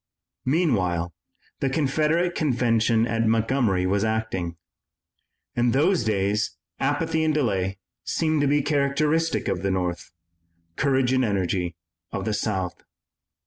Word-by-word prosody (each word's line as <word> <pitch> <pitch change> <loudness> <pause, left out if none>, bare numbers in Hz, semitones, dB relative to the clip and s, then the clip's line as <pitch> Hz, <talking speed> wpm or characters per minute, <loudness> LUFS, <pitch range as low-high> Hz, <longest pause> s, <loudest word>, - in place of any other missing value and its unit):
Meanwhile 95 - +1 0.5
the 135 - +1
Confederate 155 +5 +1
convention 115 -6 +2
at 115 -1 0
Montgomery 115 -4 +2
was 100 +2 +1
acting. 110 -6 -2 1.0
In 120 0 +2
those 160 +4 +3
days 105 0 0 0.2
apathy 160 +3 0
and 155 -1 +1
delay 95 -9 0 0.3
seemed 155 -2 0
to 145 - +2
be 145 0 +2
characteristic 150 +3 +1
of 90 - -1
the 100 - 0
North, 90 -2 -2 0.7
courage 130 -3 +2
and 130 0 +3
energy 90 -5 -1 0.4
of 100 -1 -3
the 110 - 0
South. 95 -4 -2
115 Hz, 120 wpm, -25 LUFS, 95-145 Hz, 1.0 s, those